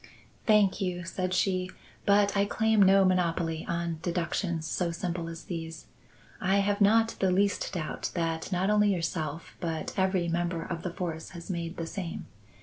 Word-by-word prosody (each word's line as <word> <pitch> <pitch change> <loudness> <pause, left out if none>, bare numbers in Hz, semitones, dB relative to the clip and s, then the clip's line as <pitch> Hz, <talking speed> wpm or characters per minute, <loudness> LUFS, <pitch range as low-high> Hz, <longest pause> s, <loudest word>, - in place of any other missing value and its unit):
"Thank 210 -3 +4
you," 180 -2 -2
said 185 +2 -3
she, 185 0 +1 0.4
"but 200 0 +4
I 200 0 +3
claim 220 +1 +2
no 195 0 +6
monopoly 170 -3 0
on 170 -1 -2
deductions 170 -1 -1
so 175 +1 -1
simple 170 0 -3
as 165 0 -8
these. 165 -2 -6 0.5
I 190 0 +2
have 200 +1 +1
not 225 +3 +5
the 190 - +3
least 200 +2 +1
doubt 160 -5 -3
that 165 +1 -2
not 185 +2 +1
only 210 -1 +4
yourself 165 -3 -3
but 165 -2 -3
every 190 -2 +2
member 170 0 -1
of 170 -1 -4
the 180 - -3
force 165 -2 -4
has 170 +3 -6
made 170 0 -4
the 165 - -3
same. 170 0 -5
180 Hz, 165 wpm, -29 LUFS, 165-195 Hz, 0.5 s, no